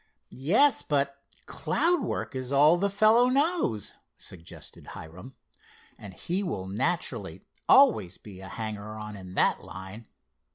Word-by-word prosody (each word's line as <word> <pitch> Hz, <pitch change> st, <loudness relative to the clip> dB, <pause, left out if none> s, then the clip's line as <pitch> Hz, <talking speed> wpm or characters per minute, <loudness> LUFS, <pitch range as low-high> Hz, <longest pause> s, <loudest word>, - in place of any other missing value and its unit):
"Yes, 205 Hz, -, +3 dB
but 140 Hz, -1 st, 0 dB, 0.3 s
cloud 345 Hz, -1 st, 0 dB
work -, -, -3 dB
is 130 Hz, 0 st, -4 dB
all 145 Hz, +4 st, +6 dB
the 200 Hz, +3 st, 0 dB
fellow 215 Hz, +5 st, +4 dB
knows," 275 Hz, -, 0 dB, 0.2 s
suggested 85 Hz, -2 st, -9 dB
Hiram, 90 Hz, +11 st, -11 dB, 0.6 s
"and 95 Hz, -3 st, -10 dB
he 180 Hz, -, -1 dB
will 170 Hz, -, -3 dB
naturally 95 Hz, +3 st, -2 dB, 0.2 s
always 90 Hz, 0 st, +5 dB
be 95 Hz, -3 st, -12 dB
a 95 Hz, -, -9 dB
hanger 110 Hz, -1 st, -6 dB
on 105 Hz, -1 st, -7 dB
in 95 Hz, -2 st, -10 dB
that -, -, +2 dB
line. 95 Hz, +5 st, -10 dB
125 Hz, 130 wpm, -27 LUFS, -, 0.6 s, all